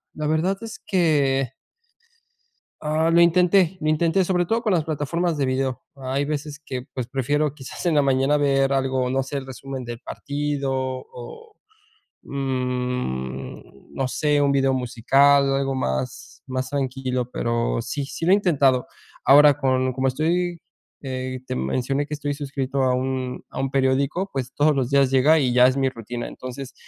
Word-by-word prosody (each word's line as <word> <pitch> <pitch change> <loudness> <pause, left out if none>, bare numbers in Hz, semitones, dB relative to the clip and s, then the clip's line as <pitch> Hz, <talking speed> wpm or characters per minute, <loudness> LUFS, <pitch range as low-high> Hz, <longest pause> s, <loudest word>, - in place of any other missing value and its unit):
la 155 - -3
verdad 165 +6 +1
es 225 -1 -8
que 140 - +1 1.3
Ah, 160 +2 +1
lo 170 - +5
intenté, 180 +1 +4
lo 155 - -1
intenté, 165 +4 +2
sobre 180 -1 +1
todo 225 +6 0
con 210 - +1
las 165 -3 +2
plataformas 160 +2 -1
de 140 - +1
video. 130 0 -1
Hay 135 +1 -2
veces 150 0 -4
que, 130 -4 -5
pues, 125 -3 -4
prefiero 145 +3 0
quizás 135 +4 -9
en 170 - +2
la 145 - +5
mañana 135 +1 +2
ver 135 -1 +2
algo, 130 -1 0
no 135 +1 +1
sé, 140 +2 -5
el 135 - -5
resumen 135 0 -7
del 120 -1 -6
partido 145 -1 -3
o, 130 - -6 0.7
mm, 125 - -4
no 135 - -1
sé, 145 +2 +1
un 140 -1 +3
video 135 -1 +2
musical, 135 +3 +3
algo 135 0 -1
más, 65 - -4
más 130 0 -3
tranquilo, 130 -2 -2
pero 115 - -1
sí, 140 -2 -4
sí 165 - -5
lo 180 - +4
he - - +8
intentado. 140 -10 +2 0.4
Ahora, 145 +1 +7
con 130 -2 +1
como 135 +1 0
estoy, 170 +6 0 0.4
eh, 130 -1 -4
te - - -4
mencioné 130 - -1
que 150 - -4
estoy 145 0 -3
suscrito 135 -1 -3
a 130 -1 +2
un 130 0 -3
a - - -6
un 135 - 0
periódico, 140 +7 +1
pues 130 -1 -3
todos 150 0 +3
los 130 -3 0
días 140 -2 +3
llega 145 +5 +5
y 130 -4 +1
ya 125 +1 +6
es 130 - 0
mi 135 -1 +2
rutina. 120 -1 -6
Entonces, 130 +1 -8
135 Hz, 170 wpm, -23 LUFS, 130-150 Hz, 1.3 s, he